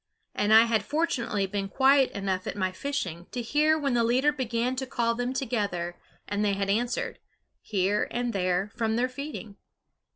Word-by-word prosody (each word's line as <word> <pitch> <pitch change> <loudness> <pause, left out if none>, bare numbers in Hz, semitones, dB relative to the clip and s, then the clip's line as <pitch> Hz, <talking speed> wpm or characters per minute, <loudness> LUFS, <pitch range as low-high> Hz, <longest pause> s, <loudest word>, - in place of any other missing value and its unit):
And 205 +1 0
I 220 +1 +9
had 225 -2 +1
fortunately 255 -8 0
been 195 0 -3
quiet 270 +3 +4
enough 190 -2 -2
at - - -3
my 185 -2 0
fishing 185 - -4
to 245 -1 -3
hear 305 +6 +3
when 280 -4 0
the 235 -1 +3
leader 255 +5 +3
began 250 -2 -1
to 265 0 -3
call 235 -3 0
them 245 +1 -2
together 205 -10 -2 0.3
and 205 +1 -1
they 205 -1 +2
had 195 0 0
answered, 245 - -1 0.4
here 200 0 0
and 240 0 -2
there, 185 +1 0
from 225 -2 0
their 245 +2 +2
feeding. 255 -6 -7
230 Hz, 175 wpm, -27 LUFS, 200-260 Hz, 0.4 s, I